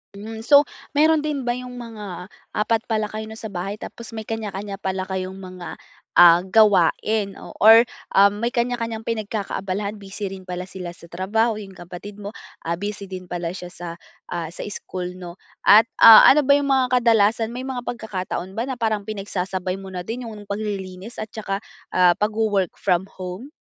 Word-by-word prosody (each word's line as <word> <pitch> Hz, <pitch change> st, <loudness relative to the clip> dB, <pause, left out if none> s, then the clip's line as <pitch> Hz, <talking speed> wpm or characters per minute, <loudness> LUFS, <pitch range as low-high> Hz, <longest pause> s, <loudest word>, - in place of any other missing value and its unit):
Hmm, 220 Hz, +2 st, -8 dB
so 285 Hz, +1 st, +8 dB, 0.3 s
meron 310 Hz, +1 st, +3 dB
din 295 Hz, -2 st, -1 dB
ba 240 Hz, -1 st, -1 dB
yung 250 Hz, 0 st, -8 dB
mga 210 Hz, -7 st, -8 dB, 0.2 s
4 225 Hz, +2 st, 0 dB
pala 215 Hz, -3 st, -1 dB
kayo 215 Hz, 0 st, -5 dB
'no, 220 Hz, -, -9 dB
sa 220 Hz, -1 st, -7 dB
bahay? 195 Hz, +3 st, -5 dB
Tapos 230 Hz, 0 st, -9 dB
may 220 Hz, -, -4 dB
kanya-kanya 205 Hz, -2 st, -5 dB
pala 190 Hz, -1 st, -3 dB
kayong 190 Hz, 0 st, -3 dB
mga, 185 Hz, -1 st, -8 dB, 0.4 s
ah, 175 Hz, +1 st, +7 dB
gawain 205 Hz, 0 st, +3 dB
o -, -, -11 dB
or 225 Hz, +2 st, +9 dB, 0.3 s
um, 200 Hz, +1 st, +5 dB
may 235 Hz, +3 st, -2 dB
kanya-kanyang 235 Hz, -2 st, -1 dB
pinagkakaabalahan, 210 Hz, -2 st, -3 dB
busy 200 Hz, 0 st, -6 dB
rin 190 Hz, -1 st, -9 dB
pala 180 Hz, 0 st, -5 dB
sila 180 Hz, -3 st, -7 dB
sa 170 Hz, 0 st, -16 dB
trabaho. 220 Hz, +4 st, 0 dB
Yung 200 Hz, -2 st, -9 dB
kapatid 185 Hz, +4 st, -10 dB
mo, 200 Hz, -, -5 dB, 0.3 s
ah, 170 Hz, +1 st, -2 dB
busy 200 Hz, 0 st, -5 dB
din 185 Hz, -1 st, -7 dB
pala 175 Hz, -1 st, -4 dB
siya 180 Hz, 0 st, -9 dB
sa, 175 Hz, 0 st, -7 dB, 0.4 s
ah, 170 Hz, -1 st, -4 dB
sa -, -, -8 dB
school 180 Hz, -2 st, -6 dB
'no? 175 Hz, -2 st, -8 dB, 0.3 s
At, 220 Hz, +2 st, +7 dB
ah, 225 Hz, -1 st, +10 dB
ano 295 Hz, 0 st, +5 dB
ba 280 Hz, -, +6 dB
yung 280 Hz, -, -2 dB
mga 255 Hz, -2 st, +3 dB
kadalasan, 225 Hz, -1 st, +3 dB
may 250 Hz, +2 st, -6 dB
mga 255 Hz, -2 st, -4 dB
pagkakataon 190 Hz, -6 st, -5 dB
ba 230 Hz, +6 st, -3 dB
na 260 Hz, -, -3 dB
parang 215 Hz, -2 st, -1 dB
pinagsasabay 190 Hz, -2 st, -3 dB
mo 190 Hz, -, -9 dB
na 180 Hz, -1 st, -6 dB
din 235 Hz, +1 st, -5 dB
yung 210 Hz, -2 st, -10 dB
paglilinis 200 Hz, 0 st, -5 dB
at 215 Hz, -1 st, -6 dB
tsaka, 200 Hz, -3 st, -3 dB, 0.3 s
ah, 180 Hz, -1 st, +5 dB
pagwo-work 210 Hz, -3 st, 0 dB
from 190 Hz, 0 st, 0 dB
home? 185 Hz, +8 st, -7 dB
205 Hz, 180 wpm, -22 LUFS, 185-225 Hz, 0.4 s, ah